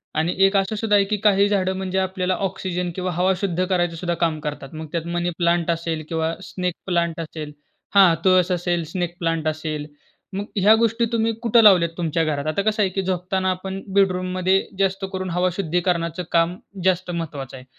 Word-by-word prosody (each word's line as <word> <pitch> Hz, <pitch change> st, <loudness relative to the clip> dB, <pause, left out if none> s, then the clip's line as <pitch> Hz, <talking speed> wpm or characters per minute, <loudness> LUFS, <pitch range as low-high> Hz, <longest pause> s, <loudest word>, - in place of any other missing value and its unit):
आणि 160 Hz, +3 st, 0 dB
एक 195 Hz, +1 st, +2 dB
असं 195 Hz, +2 st, 0 dB
सुद्धा 210 Hz, 0 st, +1 dB
आहे 200 Hz, -1 st, +4 dB
की 210 Hz, -, +1 dB
काही 200 Hz, -1 st, +4 dB
झाडं 190 Hz, -2 st, +1 dB
म्हणजे 190 Hz, 0 st, -3 dB
आपल्याला 185 Hz, 0 st, -1 dB
ऑक्सिजन 180 Hz, -1 st, -3 dB
किंवा 185 Hz, -1 st, -2 dB
हवा 180 Hz, +3 st, +2 dB
शुद्ध 185 Hz, -2 st, 0 dB
करायचं 175 Hz, -2 st, 0 dB
सुद्धा 175 Hz, +1 st, -2 dB
काम 155 Hz, -2 st, -2 dB
करतात. 150 Hz, -2 st, -6 dB
मग 160 Hz, 0 st, -6 dB
त्यात 170 Hz, -1 st, -2 dB
मनी 175 Hz, 0 st, 0 dB
प्लांट 170 Hz, -1 st, +1 dB
असेल 165 Hz, -1 st, -3 dB
किंवा 160 Hz, 0 st, -1 dB, 0.2 s
स्नेक 180 Hz, -2 st, -2 dB
प्लांट 170 Hz, -3 st, 0 dB
असेल. 155 Hz, -2 st, -6 dB, 0.4 s
हां, 190 Hz, -4 st, +7 dB
तुळस 185 Hz, -1 st, +4 dB
असेल, 175 Hz, -1 st, 0 dB
स्नेक 175 Hz, +1 st, -3 dB
प्लांट 165 Hz, -2 st, -1 dB
असेल. 155 Hz, -1 st, -3 dB, 0.5 s
मग 205 Hz, -, -3 dB
ह्या 205 Hz, +3 st, +6 dB
गोष्टी 230 Hz, +1 st, +2 dB
तुम्ही 225 Hz, 0 st, +1 dB
कुठं 235 Hz, -1 st, +5 dB
लावल्यात 180 Hz, -5 st, +6 dB
तुमच्या 165 Hz, -1 st, 0 dB
घरात? 145 Hz, -2 st, -2 dB
आता 155 Hz, +6 st, 0 dB
कसं 215 Hz, +1 st, 0 dB
आहे 195 Hz, -, +1 dB
की 195 Hz, -, -1 dB
झोपताना 185 Hz, 0 st, -1 dB
आपण 190 Hz, +1 st, -5 dB
बेडरूममध्ये 185 Hz, -1 st, +2 dB, 0.2 s
जास्त 195 Hz, 0 st, +1 dB
करून 185 Hz, 0 st, -3 dB
हवा 180 Hz, +1 st, +1 dB
शुद्धीकरणाचं 175 Hz, -1 st, -1 dB
काम 170 Hz, +1 st, +2 dB, 0.3 s
जास्त 185 Hz, -1 st, +1 dB
महत्त्वाचं 145 Hz, -6 st, -5 dB
आहे. 125 Hz, -, -13 dB
180 Hz, 190 wpm, -22 LUFS, 165-190 Hz, 0.5 s, हां